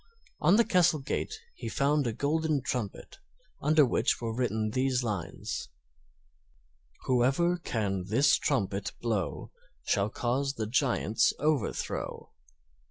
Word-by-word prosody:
On 175 - +5
the 235 +1 +5
castle 175 -3 +4
gate 135 - -3 0.2
he - - -6
found 145 -1 +1
a - - 0
golden 150 +3 0
trumpet, 120 -7 -4 0.4
under 150 0 +5
which 125 - +1
were 115 -1 -3
written 110 -3 -1
these 130 +1 +1
lines: 105 -7 -4 1.3
Whoever 135 +8 +2
can 100 - -2
this 135 +8 +4
trumpet 100 -8 -1
blow 110 -6 -2 0.3
Shall 100 +1 +1
cause 130 +5 -1
the 110 - -2
giant's 115 -2 +2
overthrow. 150 -5 -2
130 Hz, 115 wpm, -29 LUFS, 110-150 Hz, 1.3 s, On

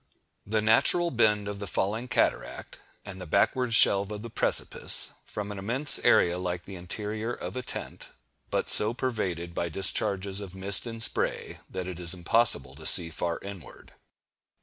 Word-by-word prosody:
The 110 0 -1
natural 170 +10 +3
bend 105 -4 +1
of 100 -1 -7
the 100 - -7
falling 110 +7 -3
cataract, 125 - -3 0.3
and 95 -2 -10
the 90 - -8
backward 115 +7 0
shelve 100 -2 +4
of 105 0 -8
the 115 - -9
precipice, - - +2
form 105 0 -7
an 100 - -8
immense 125 +9 +4
area 90 +1 +2
like 90 -1 -5
the 100 - -10
interior 105 +5 -6
of - - -8
a 130 - -4
tent, - - -6 0.4
but - - -3
so 110 +3 +3
pervaded 95 -10 -4
by 85 0 -4
discharges 100 +2 0
of 95 -2 -10
mist 95 +4 +1
and 115 -1 +2
spray, - - +1
that 90 - -6
it 90 -1 -8
is 90 0 +3
impossible 90 - +2
to 80 - -13
see 85 -2 +5
far 85 +1 -4
inward. 100 -4 -12
100 Hz, 170 wpm, -26 LUFS, 90-110 Hz, 0.4 s, see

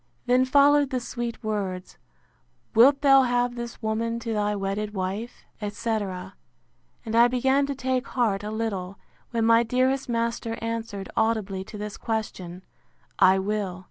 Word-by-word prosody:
Then 250 +1 +3
followed 285 +1 +4
the 260 -2 -1
sweet 240 -1 -5
words, 195 -4 -4 0.7
Wilt 270 +5 +6
thou 270 -1 +7
have 245 -1 +1
this 235 -1 -7
woman 225 +1 -1
to 230 -1 -3
thy 210 -1 0
wedded 205 +2 -3
wife? 195 +5 -4 0.2
etc. 205 -3 -3 0.7
and 225 0 -3
I 235 +1 +7
began 265 +3 +2
to 280 - -3
take 260 0 -1
heart 220 -6 0
a 210 - -4
little, 200 -4 -3 0.3
when 230 -2 0
my 230 0 +6
dearest 255 +3 0
master 230 -1 -2
answered, 225 -3 -4
audibly, 210 -4 0
to 215 - -9
this 210 0 -6
question, 185 -5 -4 0.6
I 190 +1 +6
will. 195 -2 -2
225 Hz, 145 wpm, -25 LUFS, 205-245 Hz, 0.7 s, thou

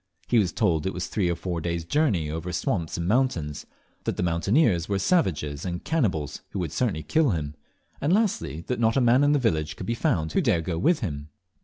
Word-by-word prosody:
He 120 - +4
was 95 -5 +1
told 80 0 +1
it 95 - -3
was 90 -1 -2
three 95 -5 0
or 85 - 0
four 85 -1 -4
days' 85 0 -2
journey 105 - +1
over 80 +4 -4
swamps 85 -1 -2
and 85 0 -2
mountains; 95 - 0 0.4
that - - -2
the - - 0
mountaineers 90 - +2
were 100 - +1
savages 90 - 0
and 85 -1 -4
cannibals, 90 - -1
who - - -3
would 85 -5 -2
certainly 100 -11 -1
kill 160 -3 +2
him; 75 -6 -2 0.5
and, 145 - +1
lastly, 190 - 0
that 125 - -2
not 115 +2 +2
a - - +5
man 125 +3 +4
in 145 +1 +4
the - - +4
village 80 - 0
could - - -7
be 115 - -1
found 90 - 0
who - - +2
dare 85 - +2
go 80 0 -3
with 165 - +2
him. 75 - -4
90 Hz, 220 wpm, -26 LUFS, 80-125 Hz, 0.5 s, a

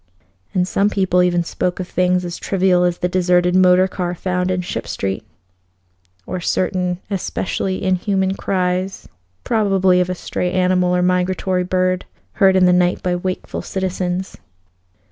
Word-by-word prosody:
And 180 -1 +2
some 200 +2 +1
people 190 -3 +2
even 175 -1 +2
spoke 180 +2 -2
of 180 - -4
things 180 0 +1
as 175 -1 -6
trivial 185 -2 +2
as 175 -1 0
the 180 - -1
deserted 180 -1 +2
motor 185 0 +5
car 180 -1 -3
found 180 +1 -1
in 185 -1 0
Ship 115 -10 -5
Street, 95 +2 -3 1.0
or 185 - -4
certain 180 0 -1
especially 190 0 -2
inhuman 190 0 +1
cries, 185 0 -2 0.4
probably 195 -5 +2
of 180 - -1
a 185 - -2
stray 180 0 -3
animal 180 -1 +2
or 180 - +1
migratory 180 0 0
bird, 185 0 0 0.4
heard 190 -1 +6
in 185 -1 +5
the 180 - +5
night 180 0 +2
by 180 -1 0
wakeful 185 +1 -4
citizens. 185 0 -3
180 Hz, 150 wpm, -19 LUFS, 180-185 Hz, 1.0 s, heard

